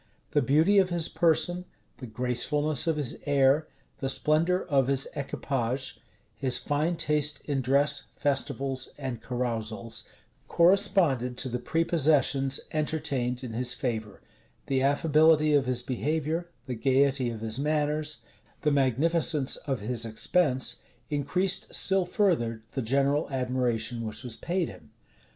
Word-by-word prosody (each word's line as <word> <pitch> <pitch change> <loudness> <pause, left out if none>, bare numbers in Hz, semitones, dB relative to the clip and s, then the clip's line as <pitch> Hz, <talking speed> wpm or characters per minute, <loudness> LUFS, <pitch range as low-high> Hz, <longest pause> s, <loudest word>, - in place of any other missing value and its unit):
The - - +2
beauty 160 +8 +4
of 190 -1 +2
his 170 -2 +1
person, 175 +2 +1 0.3
the 125 - -7
gracefulness 125 +6 0
of 165 - +2
his 145 -5 -2
air, 140 +2 +3 0.3
the 135 - -3
splendor 165 +6 +2
of 135 -6 +2
his 135 -1 +3
equipage, 130 -2 -3 0.3
his 130 -2 -1
fine 155 +4 -1
taste 150 -2 +1
in 140 -3 -1
dress, 140 +3 +1
festivals, 135 -2 -1
and 130 -5 -5
carousals, 115 -2 -3 0.4
corresponded 170 - +3
to 130 - 0
the 125 0 -3
prepossessions 145 -3 +2
entertained 145 -5 -1
in 120 -3 -6
his 125 +2 0
favor: 110 -6 -4 0.4
the 135 -1 0
affability 155 +2 +3
of 140 -3 +3
his 125 -1 0
behavior, 155 - -2 0.2
the 130 - -4
gayety 135 +1 +1
of 115 -2 -7
his 110 +2 -3
manners, 150 +1 -1 0.4
the 150 - +1
magnificence 145 +2 +2
of 135 -6 -4
his 115 +2 -3
expense, 130 +4 0 0.3
increased 180 +7 0
still 190 -1 +2
further 135 - 0
the 135 - -3
general 140 +5 +1
admiration 125 -3 -1
which 110 +3 -6
was 120 -3 -5
paid 175 +4 -2
him. 75 - -13
140 Hz, 135 wpm, -27 LUFS, 125-155 Hz, 0.4 s, beauty